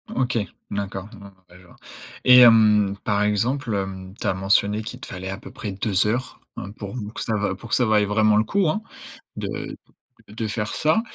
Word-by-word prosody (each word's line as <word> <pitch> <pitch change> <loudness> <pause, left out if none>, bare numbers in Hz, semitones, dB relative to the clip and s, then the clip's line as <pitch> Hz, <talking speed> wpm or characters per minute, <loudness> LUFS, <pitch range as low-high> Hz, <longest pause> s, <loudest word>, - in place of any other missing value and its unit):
OK, 125 -2 0 0.3
d'accord. 100 0 -4
Ah 100 -1 -12 0.2
ouais, 90 - -16
je 90 - -18
vois. - - -18 0.5
Et 125 0 +8
hem, 105 -4 +6
par 105 -1 +1
exemple, 115 +4 0
hem, 95 -1 -5
tu - - -6
as - - +2
mentionné 100 +3 +2
qu'il 125 +3 -8
te - - -8
fallait 95 0 -6
à 95 - -4
peu - - -12
près 105 -3 -6
2 100 +1 +1
heures, 120 +3 -2 0.2
hein, 100 - -7
pour 105 +1 -8 0.2
que - - -6
ça 110 - -1
va 100 -2 -1
pour 115 +4 -12
que - - +2
ça 125 - +2
vaille 105 -2 +3
vraiment 105 +1 +3
le 110 - +4
coup, 195 -5 +1
hein, 215 +7 -1 0.6
de - - -5 0.5
d 105 - -14
de 110 -1 -2
faire 105 0 -3
ça. 155 +8 +2
105 Hz, 215 wpm, -23 LUFS, 100-115 Hz, 0.6 s, Et